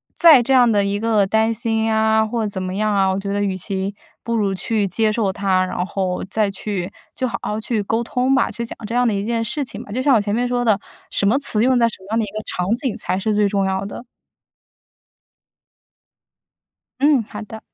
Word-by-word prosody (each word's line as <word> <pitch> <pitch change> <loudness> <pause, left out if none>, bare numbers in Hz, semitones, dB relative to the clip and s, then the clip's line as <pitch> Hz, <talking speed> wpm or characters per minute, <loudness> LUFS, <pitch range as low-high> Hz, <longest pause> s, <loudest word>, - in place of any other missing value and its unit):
再 315 -7 +7
这 255 - -2
样 245 -3 +5
的 205 -1 +3
一 200 +1 -1
个 215 -3 +2
担 220 +2 +2
心 225 -1 0
啊 220 0 +3
或 220 -1 -2
怎 190 -2 -4
么 185 0 -4
样 215 0 0
啊， 195 -1 +3
我 190 - -1
觉 200 0 -4
得 205 0 0
与 190 -2 -1
其 195 +1 -3 0.3
不 235 0 -2
如 200 -3 0
去 210 +1 -1
接 215 +2 +1
受 210 -3 0
它， 190 -1 +1
然 180 0 -3
后 185 -2 -2
再 210 0 +1
去 195 -1 -4 0.2
就 255 - -2
好 235 - -3
好 210 +1 -2
去 220 -2 -1
沟 225 +4 -1
通 255 +3 0
吧， 265 - +2
去 235 - -5
讲 - - -7
这 230 - -4
样 245 0 +3
的 220 - +1
一 200 0 -2
件 230 +1 -1
事 280 +6 -1
情 255 - -7
吧。 205 - -12
就 255 - -2
像 275 -1 +4
我 215 - +3
前 205 0 -2
面 245 +2 0
说 245 0 -1
的， 215 -3 +3 0.3
什 200 - +1
么 230 +7 +3
词 220 -6 +2
用 255 +1 +3
在 235 -1 +4
什 230 - -6
么 190 - -15
样 225 - +2
的 225 - +1
一 - - -10
个 215 0 -4
场 180 - -2
景 250 -1 -3
才 185 - -2
是 215 +1 0
最 210 -1 +3
重 195 -1 0
要 190 0 -1
的。 235 +4 -8 2.9
嗯， 285 -3 +4
好 210 +1 -9
的。 220 +1 -10
215 Hz, 255 characters per minute, -20 LUFS, 200-235 Hz, 2.9 s, 再